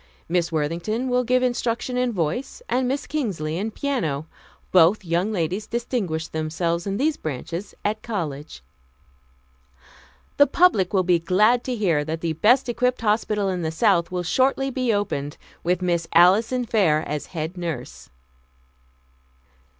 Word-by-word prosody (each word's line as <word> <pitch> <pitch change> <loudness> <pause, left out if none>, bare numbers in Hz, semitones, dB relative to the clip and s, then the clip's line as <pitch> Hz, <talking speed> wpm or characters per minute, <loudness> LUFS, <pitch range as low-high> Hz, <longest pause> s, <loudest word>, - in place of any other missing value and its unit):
Miss 170 0 0
Worthington 170 - -2
will 250 0 +2
give 255 +1 +2
instruction 245 0 -1
in 250 -1 +1
voice 200 - -3
and 255 0 0
Miss 275 +3 -2
Kingsley 180 - -2
in 215 +3 -2
piano. 205 - -2 0.5
Both 185 +3 +4
young 175 +5 0
ladies 185 +2 -2
distinguished 225 -10 -3
themselves 165 +3 -2
in 195 0 -1
these 300 +4 +1
branches 165 +6 -5
at 215 +1 -1
college." 150 - -5 1.7
"The 285 - +6
public 275 - +3
will 190 -2 +2
be 175 -1 +3
glad 210 +8 +3
to 255 - -2
hear 175 -9 +1
that 160 +2 -4
the 165 -1 -1
best 240 - +3
equipped 250 +1 0
hospital 210 -2 +1
in 180 -1 -2
the 160 - -1
South 170 0 +2
will 180 -1 -3
shortly 270 +7 +1
be 255 -2 0
opened, 150 -9 -2 0.3
with 180 +1 0
Miss 170 -2 0
Alison 220 +9 +4
Fair 190 -10 +2
as 150 0 -4
head 160 +3 -3
nurse." 170 -3 -6
190 Hz, 145 wpm, -23 LUFS, 165-240 Hz, 1.7 s, The